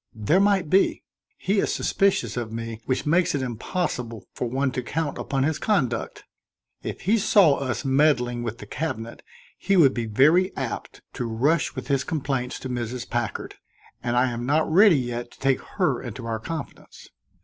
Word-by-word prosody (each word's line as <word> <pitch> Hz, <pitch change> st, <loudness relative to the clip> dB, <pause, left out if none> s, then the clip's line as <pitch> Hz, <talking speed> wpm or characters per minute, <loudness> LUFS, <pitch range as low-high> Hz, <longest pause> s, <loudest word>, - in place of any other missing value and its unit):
"There 110 Hz, -, +2 dB
might 195 Hz, -4 st, +3 dB
be. 190 Hz, +6 st, +2 dB, 0.3 s
He 200 Hz, +1 st, 0 dB
is -, -, +1 dB
suspicious 190 Hz, -, +1 dB
of 120 Hz, -3 st, -3 dB
me, 115 Hz, 0 st, -5 dB
which 130 Hz, -, -1 dB
makes 170 Hz, +1 st, +2 dB
it 135 Hz, -, -1 dB
impossible 120 Hz, -, -3 dB
for 125 Hz, -, -3 dB
one 135 Hz, +2 st, 0 dB
to 125 Hz, -, -3 dB
count 150 Hz, +4 st, -3 dB
upon 135 Hz, -1 st, -1 dB
his 155 Hz, +1 st, 0 dB
conduct. 130 Hz, -, -1 dB, 0.6 s
If -, -, -6 dB
he 220 Hz, +4 st, +2 dB
saw 195 Hz, -8 st, +5 dB
us 135 Hz, +1 st, -3 dB
meddling 130 Hz, -3 st, +2 dB
with 115 Hz, -1 st, -4 dB
the -, -, -10 dB
cabinet, 115 Hz, -8 st, -5 dB, 0.4 s
he 195 Hz, -1 st, +2 dB
would 140 Hz, -6 st, +6 dB
be 115 Hz, -2 st, -3 dB
very 155 Hz, -, +3 dB
apt 130 Hz, -5 st, -5 dB
to 125 Hz, -, -3 dB
rush 135 Hz, +8 st, +1 dB
with -, -, -6 dB
his 140 Hz, -2 st, +1 dB
complaints 135 Hz, -5 st, -2 dB
to -, -, -5 dB
Mrs. 120 Hz, 0 st, -4 dB
Packard, 120 Hz, -4 st, -3 dB, 0.5 s
and 120 Hz, 0 st, -1 dB
I 125 Hz, 0 st, +3 dB
am 120 Hz, 0 st, -4 dB
not 150 Hz, +5 st, +2 dB
ready 190 Hz, -1 st, +7 dB
yet 120 Hz, -1 st, -3 dB
to -, -, -20 dB
take 135 Hz, -1 st, +1 dB, 0.2 s
her -, -, +1 dB
into 125 Hz, -, -7 dB
our 115 Hz, -1 st, -2 dB
confidence. 160 Hz, +5 st, -8 dB
130 Hz, 180 wpm, -24 LUFS, 120-160 Hz, 0.6 s, ready